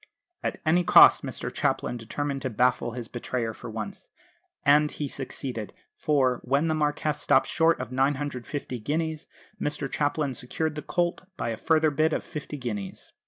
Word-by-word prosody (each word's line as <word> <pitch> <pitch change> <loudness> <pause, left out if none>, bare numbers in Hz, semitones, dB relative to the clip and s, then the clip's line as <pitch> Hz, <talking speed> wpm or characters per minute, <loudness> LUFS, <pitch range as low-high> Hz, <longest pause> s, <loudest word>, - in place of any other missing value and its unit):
At - - -3
any 175 +3 +4
cost - - +8
Mr - - -5
Chaplin - - 0
determined 135 +4 -3
to 130 - -2
baffle 120 0 +1
his 120 -2 -5
betrayer 120 -1 -3
for 115 - -9
once 110 -1 -6 0.6
and 150 +1 +5
he 150 - -4
succeeded; 125 -5 -5 0.2
for, 130 -5 +1
when 140 +5 +1
the 160 - +1
Marquess 150 -1 0
stopped - - +4
short 165 0 +2
at 125 -1 -5
950 135 -1 -2
guineas, 155 +5 -2 0.3
Mr 150 -1 -2
Chaplin 145 0 0
secured 150 +6 -2
the 150 - -5
colt 175 +2 -1
by - - -2
a 115 - -2
further 155 +5 +2
bid 155 +2 +2
of - - -1
50 150 0 -6
guineas. 105 -7 -6
140 Hz, 165 wpm, -27 LUFS, 125-150 Hz, 0.6 s, cost